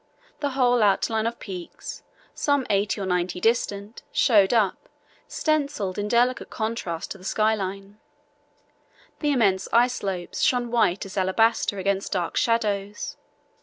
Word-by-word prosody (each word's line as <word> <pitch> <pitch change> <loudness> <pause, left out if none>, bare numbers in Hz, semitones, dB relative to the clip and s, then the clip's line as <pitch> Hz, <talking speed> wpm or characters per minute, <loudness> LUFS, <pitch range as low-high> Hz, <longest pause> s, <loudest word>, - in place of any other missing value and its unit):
The 285 - -1
whole 245 -2 +4
outline 220 +2 +2
of 235 - -3
peaks, 185 -4 -8 0.3
some 285 -3 +1
eighty 205 +1 +1
or 195 - -2
ninety 180 0 -1
distant, 215 -1 -1
showed 205 -7 +4
up, 215 -6 +1 0.4
stencilled 280 - -1
in 205 - -2
delicate 245 +3 +1
contrast 220 -7 -3
to 195 - -6
the - - -15
sky 215 +3 +2
line. 195 0 -5 1.2
The 295 -2 +1
immense 200 -8 +2
ice 245 +2 +4
slopes 185 -6 -4
shone 245 -2 +2
white 205 -6 +2
as 195 +1 -9
alabaster 200 +2 +2
against 195 +1 -1
dark 175 -3 -2
shadows. 210 -3 0
210 Hz, 135 wpm, -25 LUFS, 195-235 Hz, 1.2 s, whole